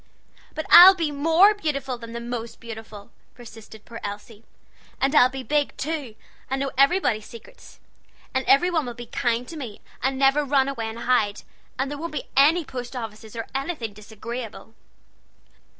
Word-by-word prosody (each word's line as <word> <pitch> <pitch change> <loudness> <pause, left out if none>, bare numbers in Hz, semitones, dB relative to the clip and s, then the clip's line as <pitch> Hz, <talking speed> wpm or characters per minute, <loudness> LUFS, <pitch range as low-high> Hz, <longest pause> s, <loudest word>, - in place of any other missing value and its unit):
"But 315 - -4
I'll 375 +2 +11
be 330 -4 -1
more 325 +8 +4
beautiful 275 -9 -3
than 230 -1 -9
the 235 - -4
most 235 -1 -6
beautiful," 220 -2 -10 0.2
persisted 225 -2 -13
poor 230 - -10
little 200 - -4
Elsie; 210 +1 -16 0.6
"and 270 +2 +1
I'll 255 -4 +6
be 265 0 -7
big, 295 +1 -1
too, 290 -7 -4 0.3
and 270 - -1
know 275 0 -2
everybody's 275 - +2
secrets. - - -14 0.5
And 260 0 0
everybody'll 295 -4 +2
be 240 0 -8
kind, 240 +1 -1
then, 255 -9 -8 0.2
and 265 +1 0
never 275 +2 +3
run 275 -1 +2
away 235 -5 -3
and 220 - -8
hide; 215 -5 +1 0.3
and 270 +2 -2
there 290 - -6
won't 335 0 -6
be - - -5
any 310 +5 +4
post 250 -1 -7
offices, 220 -2 -8
or 230 - -4
anything 270 -6 -4
disagreeable." 225 +2 -8
255 Hz, 165 wpm, -24 LUFS, 230-290 Hz, 0.6 s, I'll